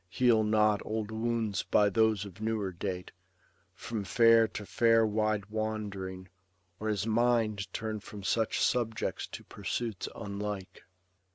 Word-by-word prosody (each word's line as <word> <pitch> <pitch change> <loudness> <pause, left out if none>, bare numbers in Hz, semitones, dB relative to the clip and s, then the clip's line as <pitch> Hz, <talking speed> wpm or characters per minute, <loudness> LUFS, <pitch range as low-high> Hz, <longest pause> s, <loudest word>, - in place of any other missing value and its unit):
Heal 115 +1 +3
not 105 -1 +3
old 110 -1 -3
wounds 110 -3 -1
by 100 +2 +3
those 110 0 +2
of 100 +1 -11
newer 110 -3 -1
date. 90 +1 -5 0.6
From 110 -3 -4
fair 115 +2 +5
to 105 -1 -7
fair 115 +1 +4
wide 105 -1 0
wand'ring, 100 -4 -4 0.5
or 110 - -3
his 105 -3 0
mind 115 -3 +1
Turn 110 -1 -3
from 105 0 -10
such 110 +2 +1
subjects 115 -2 0
to - - -9
pursuits 105 +1 -4
unlike. 100 -1 -5
110 Hz, 130 wpm, -30 LUFS, 100-110 Hz, 0.6 s, fair